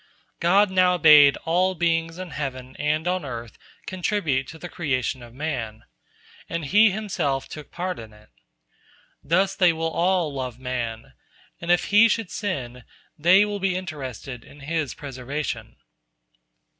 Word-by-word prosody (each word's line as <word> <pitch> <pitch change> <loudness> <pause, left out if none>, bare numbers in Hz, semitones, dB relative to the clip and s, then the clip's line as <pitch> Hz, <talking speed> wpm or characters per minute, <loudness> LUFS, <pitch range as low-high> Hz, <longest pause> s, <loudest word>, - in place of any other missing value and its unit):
" - - -44
God 200 +2 +5
now 180 -1 +4
bade 150 -4 +7
all 185 +3 +2
beings 165 0 0
in 185 -3 -7
heaven 130 -3 -5
and 155 +3 0
on 185 0 0
earth 120 -4 -7 0.3
contribute 180 -8 -1
to 160 - -10
the 175 - -7
creation 130 -7 -2
of 120 -1 -12
man, 120 -6 -4 0.7
and 165 -2 -3
He 210 +9 +5
Himself 180 -10 -2
took 150 -2 -9
part 180 +1 -4
in 110 -1 -10
it. 105 0 -19 0.9
Thus 190 +6 +2
they 180 -3 +5
all 165 +1 0
will - - -10
love 130 -3 -4
man, 120 -3 -5 0.5
and 170 - -7
if 175 0 +4
he 225 +2 +7
should 220 -3 -1
sin, 125 - -4 0.3
they 180 +6 +5
will 205 -1 -4
be 190 -1 0
interested 135 - -6
in 145 - -16
his 155 -2 -2
preservation. 140 +1 -5
160 Hz, 150 wpm, -24 LUFS, 130-185 Hz, 0.9 s, bade